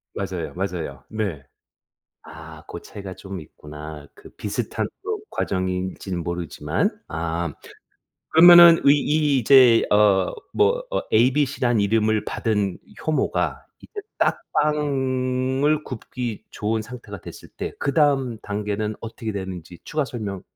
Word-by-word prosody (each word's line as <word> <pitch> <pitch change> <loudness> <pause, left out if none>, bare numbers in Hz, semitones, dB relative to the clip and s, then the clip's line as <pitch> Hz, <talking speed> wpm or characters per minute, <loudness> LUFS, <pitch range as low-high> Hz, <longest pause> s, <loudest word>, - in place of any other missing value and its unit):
맞아요, - - -4
맞아요. 85 -8 -4
네. 100 -11 -3 0.8
아 - - -11
고 - - -7
차이가 100 -2 -9
좀 95 0 -8
있구나. 75 -1 -10
그 - - -14
비슷한 105 +2 -3 0.2
또 430 +1 -3
과정인지는 95 -1 -3
모르지만. 85 -1 -1 0.2
아. 80 0 -3 0.8
그러면은 170 0 +9
의 140 +1 +7
이 150 -1 +2
이제 125 -1 +6
어 100 -3 +4 0.2
뭐 470 +4 +2
어 - - 0
ABC라는 125 -1 +2
이름을 110 +1 +2
받은 105 -4 -1 0.3
효모가 155 -1 0 0.2
이제 415 - -8 0.2
딱 - - +1
빵을 135 -1 +1
굽기 120 -3 -6
좋은 110 +1 -2
상태가 110 -4 -9
됐을 - - -11
때 - - -6
그 140 - -1
다음 135 -6 +2
단계는 105 +1 -3
어떻게 115 0 -6
되는지 90 -3 -7
추가 150 -1 -1
설명 105 -7 -5
110 Hz, 250 characters per minute, -23 LUFS, 95-135 Hz, 0.8 s, 그러면은